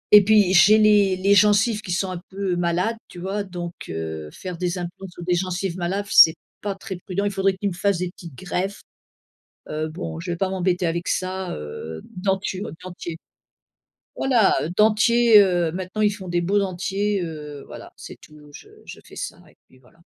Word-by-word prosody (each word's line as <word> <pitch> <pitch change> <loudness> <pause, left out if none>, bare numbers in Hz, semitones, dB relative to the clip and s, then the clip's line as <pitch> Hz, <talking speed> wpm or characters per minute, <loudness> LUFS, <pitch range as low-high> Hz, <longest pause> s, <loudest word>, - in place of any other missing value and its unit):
et 210 0 +10
puis 205 -2 +4
j'ai 200 +3 +7
les 210 -3 +4
les 195 +2 +3
gencives 210 +2 +4
qui 180 -4 -6
sont 190 +1 -1
un 180 - -5
peu 195 -1 -2
malades, 175 +6 0
tu - - -12
vois? 195 +3 -3
Donc, 175 -2 -6 0.2
heu, 80 -1 -5
faire 180 - -8
des 180 0 -2
implants 180 +2 -6
sur 175 -1 -11
des 180 - +1
gencives 185 0 -2
malades 190 +4 -2
f - - -13
c'est 160 - +8 0.3
pas 200 -1 -3
très 195 -1 -7
prudent. 190 +3 -3
Il 205 - 0
faudrait 195 0 +1
qu'il 200 +1 -2
me 175 - -6
fasse 195 0 0
des 180 0 -2
petites 170 -5 -12
greffes. 190 +3 -3 0.9
Heu, 155 +1 -3
bon 165 0 -6
je 175 +1 -4
vais - - -3
pas 190 +2 0
m'embêter 185 -1 0
avec 170 +1 -3
ça, 185 0 -2
heu, 80 +2 -7
denture 190 +1 -2
dentier. 175 -2 -7 1.0
Voilà, 240 -7 +3
heu, - - -3
dentier, 220 +1 +5
heu, 175 -4 +2
maintenant 185 +4 -4
ils 210 - +4
font 190 -3 -9
des 175 0 0
beaux 200 +4 +1
dentiers, 195 +1 -1
heu, 150 -3 -7
voilà - - -11
c'est - - -10
tout 150 -1 -16
je - - -13 0.2
je - - -10
fais - - -15
ça - - -5
et - - -24
puis 130 - -22
voilà. 130 +6 -25
185 Hz, 200 wpm, -23 LUFS, 175-200 Hz, 1.0 s, et